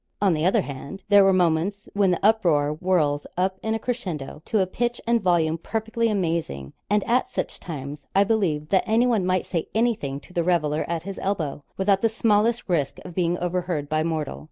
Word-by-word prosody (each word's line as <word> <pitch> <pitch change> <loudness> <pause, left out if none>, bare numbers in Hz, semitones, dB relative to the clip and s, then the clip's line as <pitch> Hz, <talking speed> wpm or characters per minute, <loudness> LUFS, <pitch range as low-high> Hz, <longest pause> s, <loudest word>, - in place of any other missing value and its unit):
On 200 -3 +3
the 155 +2 +1
other 190 - +3
hand, 140 +8 -8
there 205 -1 +7
are - - +5
moments 185 +3 +1
when 200 -2 +3
the 180 - +1
uproar 170 -10 +3
whirls 155 -4 0
up 190 +1 0
in 220 0 -1
a - - +1
crescendo 185 - -4
to 215 - +1
a 190 - +3
pitch 240 +6 -2
and 235 0 +2
volume 165 -3 +2
perfectly 225 +4 -1
amazing; 165 - -2 0.2
and 205 0 +2
at 245 +2 +1
such - - -4
times, 145 -3 -7
I 195 - +6
believe 180 -9 0
that 190 - +3
anyone 225 -3 +2
might 185 -1 +1
say 165 -4 -2
anything 220 - 0
to 180 - -17
the 170 - +1
reveller 160 -3 +1
at 170 -1 -3
his 195 +1 -6
elbow, 160 -7 -2
without 195 0 +2
the 225 - +3
smallest 225 +1 +1
risk 160 -7 0
of 180 - -8
being 175 0 0
overheard 175 -4 -2
by 155 0 +1
mortal. 160 -3 -2
180 Hz, 200 wpm, -24 LUFS, 155-205 Hz, 0.2 s, there